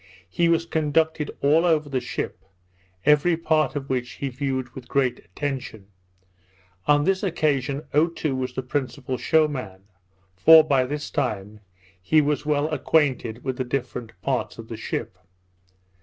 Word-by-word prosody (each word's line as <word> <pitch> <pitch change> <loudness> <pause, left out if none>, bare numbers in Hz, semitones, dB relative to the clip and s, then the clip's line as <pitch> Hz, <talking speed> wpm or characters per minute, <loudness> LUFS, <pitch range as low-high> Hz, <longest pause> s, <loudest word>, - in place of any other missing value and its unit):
He 170 - +2
was 165 0 +2
conducted 160 -1 0
all 150 +4 +4
over 160 -4 +2
the 135 -2 -1
ship, 125 - -5 0.6
every 150 +3 +4
part 155 -2 +1
of 140 -1 -4
which 125 -3 -2
he 140 - -4
viewed 130 -1 -2
with 130 -2 -10
great 130 -2 +1
attention. 130 -8 -6 1.0
On 145 0 +4
this 190 +3 +1
occasion 145 -6 0
Otoo 155 -2 +1
was 130 -1 -3
the 130 - -3
principal 130 -1 -3
show 160 -1 +3
man; 105 -10 -7 0.5
for, 160 - +8
by 135 -4 +2
this 150 +3 -5
time, 105 +1 -2 0.4
he 155 +12 +3
was 150 0 0
well 150 0 +2
acquainted 135 -6 0
with 130 -2 -3
the 130 - -1
different 125 -2 -5
parts 135 -2 -1
of 115 -1 -10
the 115 - -5
ship. 110 -3 -5
140 Hz, 150 wpm, -24 LUFS, 125-155 Hz, 1.0 s, for